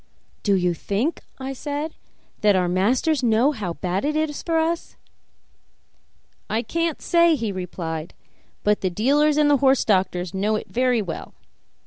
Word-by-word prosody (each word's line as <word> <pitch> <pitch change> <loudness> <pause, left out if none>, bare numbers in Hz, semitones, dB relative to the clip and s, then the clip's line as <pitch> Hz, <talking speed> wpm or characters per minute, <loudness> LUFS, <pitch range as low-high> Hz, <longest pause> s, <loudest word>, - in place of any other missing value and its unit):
"Do 200 -2 +2
you 180 -2 +1
think," 210 - -2 0.2
I 270 0 -5
said, 290 +3 -4 0.5
"that 210 -2 +4
our 180 -1 +2
masters 240 - +1
know 240 +3 +3
how 200 - -4
bad 185 +2 -2
it 300 +1 0
is 310 -1 -1
for 330 -1 0
us?" 330 +1 -1 1.5
"I 225 +2 0
can't 335 0 -1
say," 340 -1 +4
he 225 -6 -2
replied, 170 -3 -5 0.5
"but 210 0 +2
the 185 - +1
dealers 285 - +2
and 300 -1 +4
the 290 -1 +5
horse 270 0 +3
doctors 185 -3 +1
know 205 +3 0
it 215 - -5
very 250 -2 +2
well. 170 -4 -7
230 Hz, 155 wpm, -23 LUFS, 190-295 Hz, 1.5 s, the